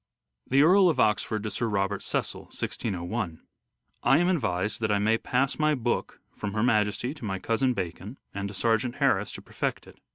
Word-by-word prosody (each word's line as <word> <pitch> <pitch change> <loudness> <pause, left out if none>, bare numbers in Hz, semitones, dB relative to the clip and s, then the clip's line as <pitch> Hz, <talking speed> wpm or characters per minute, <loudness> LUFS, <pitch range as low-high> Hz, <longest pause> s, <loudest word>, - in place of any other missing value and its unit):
The 135 +2 +4
Earl 185 +3 +6
of 160 - 0
Oxford 105 0 +1
to 105 - -3
Sir 115 - -1
Robert 100 -1 -1
Cecil - - -2
(1601): 90 -3 -3 0.3
" - - -58 0.3
I 135 - +5
am 175 +2 +3
advised 105 - -1
that 110 -1 +1
I 105 - +3
may 110 +3 +2
pass 135 +4 0
my 155 0 +3
book 120 -2 -2
from 105 -1 -5
Her 110 0 0
Majesty 110 +2 +1
to 145 - -13
my 95 -3 -2
cousin 120 +5 0
Bacon 95 +6 -5 0.2
and 100 0 -3
to 100 - -8
Sergeant 115 +3 +1
Harris - - +2
to - - -8
perfect - - -3
it." - - -16
110 Hz, 195 wpm, -27 LUFS, 100-130 Hz, 0.3 s, Earl